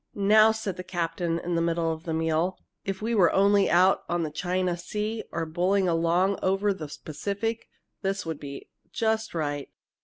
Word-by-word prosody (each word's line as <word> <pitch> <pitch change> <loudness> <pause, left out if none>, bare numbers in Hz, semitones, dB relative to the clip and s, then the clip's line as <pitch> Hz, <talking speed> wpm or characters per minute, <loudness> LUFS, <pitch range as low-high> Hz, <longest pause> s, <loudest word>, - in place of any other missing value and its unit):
"Now," 215 +2 +6
said 215 -4 -4
the 180 - -5
captain, 170 -1 -2
in 175 +1 -3
the 165 - +1
middle 165 -1 +1
of 160 +1 -10
the 165 - -2
meal, 165 +3 0 0.3
"if 195 +1 -4
we 230 +2 0
were 190 -6 +5
only 200 0 +4
out 185 +2 +4
on 175 0 0
the 155 - -3
China 180 +3 -1
Sea 210 +5 -3
or 165 -1 -2
bowling 185 +4 +1
along 175 +3 +2
over 195 +2 +2
the 155 -6 -8
Pacific, 200 +9 -3 0.3
this 195 -1 -2
would 160 -2 -4
be 140 -1 -8 0.2
just 220 -3 -1
right. 145 -3 -2
180 Hz, 180 wpm, -27 LUFS, 165-200 Hz, 0.3 s, Now